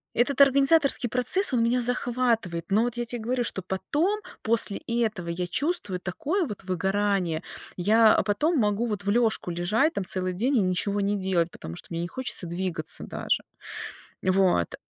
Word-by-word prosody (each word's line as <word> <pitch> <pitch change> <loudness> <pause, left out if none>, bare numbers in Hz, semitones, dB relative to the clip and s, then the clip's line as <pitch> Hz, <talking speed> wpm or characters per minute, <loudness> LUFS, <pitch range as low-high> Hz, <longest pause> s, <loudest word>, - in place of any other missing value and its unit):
Этот 265 +4 +2
организаторский 275 -1 +4
процесс- 255 - +3
он 235 -2 +2
меня 245 +2 +1
захватывает, 235 -8 -1
но 210 +3 +3
вот 240 0 -3
я 240 - -2
те 240 +1 -4
говорю, 245 +2 -1
что 190 - -3
потом, 295 - -1 0.2
после 225 -2 +3
этого, 220 -7 -1
я 175 +1 -3
чувствую 205 - -1
такое 320 - -2
вот 210 -7 -7
выгорание! 190 -2 0 0.4
Я, 215 +4 +5
э, - - +1
потом 300 +11 +1
могу 210 +1 +1
вот 210 -3 -3
в - - 0
лежку 220 -4 +1
лежать 210 - +1
там 190 - -3
целый 185 0 -2
день 250 +9 +1
и 215 - +4
ничего 195 +2 0
не 200 +1 0
делать, 185 -3 0
потому 80 - -9
что - - -11
мне 170 0 -3
не 175 - -3
хочется 255 -3 -2
двигаться 170 -2 -2
даже. - - -2 0.8
Вот. 185 - +2
210 Hz, 175 wpm, -26 LUFS, 185-245 Hz, 0.8 s, Я